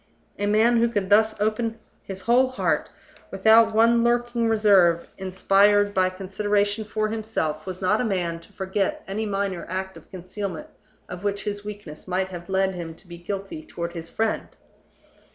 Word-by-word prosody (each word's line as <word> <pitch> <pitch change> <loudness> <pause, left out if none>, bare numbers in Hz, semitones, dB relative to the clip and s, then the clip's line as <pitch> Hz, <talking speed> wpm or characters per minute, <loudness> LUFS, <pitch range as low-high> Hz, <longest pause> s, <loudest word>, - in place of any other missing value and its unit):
A 205 - 0
man 220 +3 +4
who 235 +1 +3
could 205 -4 -2
thus 220 +1 +4
open 220 +2 -1 0.2
his 190 -1 -8
whole 245 +5 +4
heart, 255 - -1 0.4
without 220 +3 +5
one 230 +1 +5
lurking 240 -1 +1
reserve 195 -6 +4
inspired 200 +2 +3
by 185 -1 +3
consideration 205 +3 -1
for 215 0 -1
himself, 210 -8 -3
was 185 0 -6
not 210 +5 +2
a - - 0
man 180 -6 -1
to 165 - -19
forget 190 0 -2
any 215 +3 -3
minor 195 -3 -2
act 190 +1 -4
of - - -16
concealment 200 - -6 0.4
of 180 +1 -8
which 200 0 -1
his 205 -1 -4
weakness 205 -8 -9
might 185 +1 -1
have 175 -1 -9
led 190 0 +1
him 170 -2 -6
to - - -20
be 170 0 -10
guilty 195 - -5
toward 170 - -6
his 165 -1 -7
friend. 225 0 -1
205 Hz, 170 wpm, -24 LUFS, 185-220 Hz, 0.4 s, without